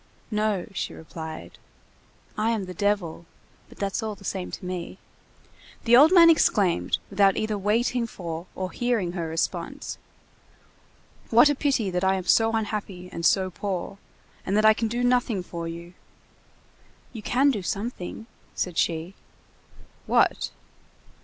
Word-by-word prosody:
"No," 210 Hz, -3 st, 0 dB
she -, -, -4 dB
replied. 160 Hz, 0 st, -9 dB, 0.8 s
"I 220 Hz, 0 st, +1 dB
am 220 Hz, -4 st, -1 dB
the 185 Hz, -, -7 dB
devil, 180 Hz, -4 st, -1 dB, 0.4 s
but -, -, -16 dB
that's 200 Hz, -1 st, -2 dB
all 215 Hz, -1 st, -3 dB
the 195 Hz, -, -17 dB
same 190 Hz, -1 st, -3 dB
to 185 Hz, -, -7 dB
me." 180 Hz, 0 st, -5 dB, 0.9 s
The 235 Hz, 0 st, +5 dB
old 295 Hz, +6 st, +8 dB
man 345 Hz, -3 st, +8 dB
exclaimed, 205 Hz, -, +3 dB
without 195 Hz, -1 st, +4 dB
either 215 Hz, 0 st, -1 dB
waiting 230 Hz, +4 st, 0 dB
for 170 Hz, -4 st, -6 dB
or 185 Hz, -1 st, -4 dB
hearing 235 Hz, -8 st, 0 dB
her 170 Hz, -2 st, -3 dB
response:— 165 Hz, +1 st, -3 dB, 1.3 s
"What 240 Hz, +6 st, +7 dB
a -, -, +3 dB
pity 265 Hz, -8 st, 0 dB
that 180 Hz, +1 st, -1 dB
I 190 Hz, 0 st, +3 dB
am 185 Hz, -2 st, -4 dB
so 225 Hz, +5 st, +4 dB
unhappy 205 Hz, -4 st, -3 dB
and 170 Hz, -, -6 dB
so 185 Hz, +2 st, +3 dB
poor, 195 Hz, 0 st, -4 dB, 0.4 s
and 195 Hz, +2 st, 0 dB
that 215 Hz, -, +3 dB
I 220 Hz, -, +8 dB
can 225 Hz, +1 st, -1 dB
do 240 Hz, +2 st, -2 dB
nothing 245 Hz, -6 st, +1 dB
for 170 Hz, -1 st, -6 dB
you!" 170 Hz, +1 st, -8 dB, 1.2 s
"You 225 Hz, -, -7 dB
can 265 Hz, +6 st, +3 dB
do 210 Hz, -6 st, -3 dB
something," 200 Hz, +2 st, -4 dB, 0.3 s
said 180 Hz, -3 st, -2 dB
she. 165 Hz, +2 st, -1 dB, 0.9 s
"What?" -, -, +2 dB
200 Hz, 145 wpm, -25 LUFS, 180-225 Hz, 1.3 s, old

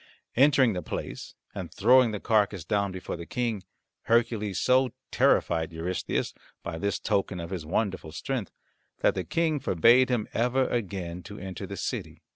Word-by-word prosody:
Entering 130 Hz, -3 st, +5 dB
the 90 Hz, -, -3 dB
place -, -, -6 dB, 0.2 s
and -, -, -6 dB
throwing 125 Hz, +3 st, +5 dB
the 105 Hz, -2 st, -4 dB
carcass 100 Hz, -6 st, +1 dB
down 100 Hz, -1 st, 0 dB
before 95 Hz, 0 st, -5 dB
the 85 Hz, -1 st, -8 dB
king, 115 Hz, -5 st, -2 dB, 0.4 s
Hercules 115 Hz, -4 st, +1 dB
so 130 Hz, -1 st, +3 dB, 0.2 s
terrified 80 Hz, 0 st, +2 dB
Eurystheus 85 Hz, +3 st, -2 dB, 0.3 s
by 80 Hz, -, -5 dB
this 100 Hz, +1 st, 0 dB
token 100 Hz, -3 st, -1 dB
of 85 Hz, +1 st, -6 dB
his 85 Hz, -5 st, -5 dB
wonderful 95 Hz, -3 st, -1 dB
strength 110 Hz, +6 st, -3 dB, 0.5 s
that -, -, +4 dB
the 95 Hz, -, -2 dB
King 160 Hz, -, 0 dB
forbade 120 Hz, +5 st, +4 dB
him 120 Hz, -4 st, 0 dB
ever 125 Hz, +3 st, +2 dB
again 95 Hz, -6 st, -3 dB
to 100 Hz, +4 st, -10 dB
enter 95 Hz, -1 st, -6 dB
the -, -, -6 dB
city. -, -, -4 dB
100 Hz, 160 wpm, -27 LUFS, 90-120 Hz, 0.5 s, Entering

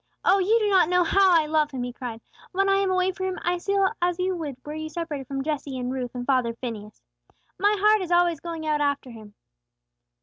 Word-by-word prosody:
Oh, 390 Hz, +2 st, +5 dB
you 410 Hz, +5 st, +3 dB
do 430 Hz, -2 st, +1 dB
not 375 Hz, -5 st, +4 dB
know 360 Hz, 0 st, +3 dB
how 385 Hz, +3 st, +4 dB
I 310 Hz, -, 0 dB
love 305 Hz, -1 st, +1 dB
Him!" 260 Hz, -3 st, -4 dB
he 245 Hz, 0 st, -5 dB
cried. 235 Hz, -3 st, -7 dB, 0.3 s
"When 390 Hz, +1 st, +1 dB
I 390 Hz, -, +4 dB
am 390 Hz, -1 st, +1 dB
away 370 Hz, 0 st, +2 dB
from 375 Hz, 0 st, -4 dB
Him, 370 Hz, -, -4 dB
I 350 Hz, 0 st, 0 dB
feel 395 Hz, +1 st, +1 dB
as 350 Hz, 0 st, +1 dB
you 370 Hz, 0 st, -1 dB
would 305 Hz, -6 st, -5 dB
were 295 Hz, -, -6 dB
you 315 Hz, 0 st, -5 dB
separated 310 Hz, -6 st, -5 dB
from 270 Hz, 0 st, -3 dB
Jesse 285 Hz, -3 st, -3 dB
and 250 Hz, 0 st, -3 dB
Ruth 250 Hz, -2 st, -5 dB
and 245 Hz, 0 st, -4 dB
father 250 Hz, -4 st, +1 dB
Phineas. 220 Hz, -4 st, -8 dB, 0.6 s
My 410 Hz, +2 st, +3 dB
heart 425 Hz, +1 st, +4 dB
is 365 Hz, -, -4 dB
always 345 Hz, -2 st, +3 dB
going 330 Hz, -1 st, -6 dB
out 300 Hz, -1 st, 0 dB
after 285 Hz, -3 st, -1 dB
Him!" 215 Hz, -2 st, -13 dB
315 Hz, 235 wpm, -25 LUFS, 265-370 Hz, 0.6 s, Oh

